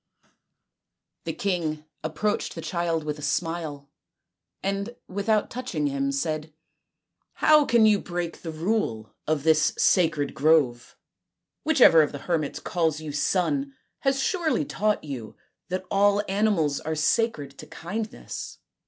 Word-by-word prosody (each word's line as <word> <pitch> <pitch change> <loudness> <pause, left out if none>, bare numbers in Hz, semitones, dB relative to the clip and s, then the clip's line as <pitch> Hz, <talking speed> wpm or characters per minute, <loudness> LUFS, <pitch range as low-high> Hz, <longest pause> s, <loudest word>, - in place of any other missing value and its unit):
The - - -2
king 160 -6 -2 0.2
approached 160 +7 -1
the - - -5
child 170 -3 -1
with 150 0 -4
a - - -9
smile, 155 -2 -2 0.8
and 200 +4 -2
without 205 +2 0
touching 240 -12 -3
him 140 -1 0
said: 155 +2 -2 0.4
" - - -53
How 305 -1 +7
can 235 -4 +4
you 210 -2 +5
break 175 -2 -4
the 165 - -6
rule 155 - -2
of 155 -2 0
this 155 -1 +3
sacred 155 -6 +2
grove? 140 -5 +2 0.7
Whichever 260 - +6
of 150 - 0
the - - -4
hermits 160 -5 -1
calls 160 -4 0
you 155 -1 -6
son 230 - 0 0.2
has 270 0 +1
surely 325 0 0
taught 210 -4 0
you 130 -7 -7 0.3
that 185 +1 -3
all 205 +1 +3
animals 195 -8 +1
are 160 +1 -3
sacred 155 - 0
to - - -9
kindness." 215 +6 -6
170 Hz, 135 wpm, -26 LUFS, 150-210 Hz, 0.8 s, How